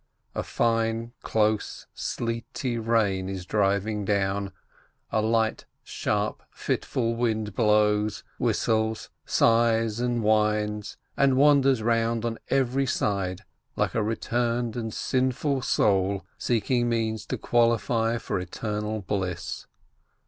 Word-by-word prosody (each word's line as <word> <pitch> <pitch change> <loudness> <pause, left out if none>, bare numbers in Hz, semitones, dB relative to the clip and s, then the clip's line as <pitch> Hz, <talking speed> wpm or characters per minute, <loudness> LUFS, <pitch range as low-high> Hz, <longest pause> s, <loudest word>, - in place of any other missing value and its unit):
A - - -2
fine, 115 0 0
close, 110 -1 0
sleety 115 +1 -3
rain 105 -5 +1
is 95 -2 -5
driving 100 +1 0
down, 100 0 0 0.6
a 110 - +2
light, 110 0 0 0.2
sharp, - - -2
fitful 115 -2 -2
wind 110 -3 -1
blows, 105 -1 +2 0.2
whistles, 110 0 0 0.2
sighs, 115 -1 +3
and 120 -1 0
whines, 105 -1 +1 0.2
and 135 -2 +3
wan 145 0 +6
ders 130 -4 +2
round 115 0 +1
on 115 -1 -3
every 135 0 +1
side, 95 -6 -1 0.3
like - - 0
a 115 - +1
returned 115 +1 -1
and 115 -2 -3
sinful 130 +4 0
soul 100 -3 +1
seeking 120 +1 0
means 110 -2 -1
to - - -2
qualify 115 -1 +2
for 100 -4 -3
eternal 105 +4 -3
bliss. 95 -3 -3
110 Hz, 110 wpm, -26 LUFS, 105-120 Hz, 0.6 s, wan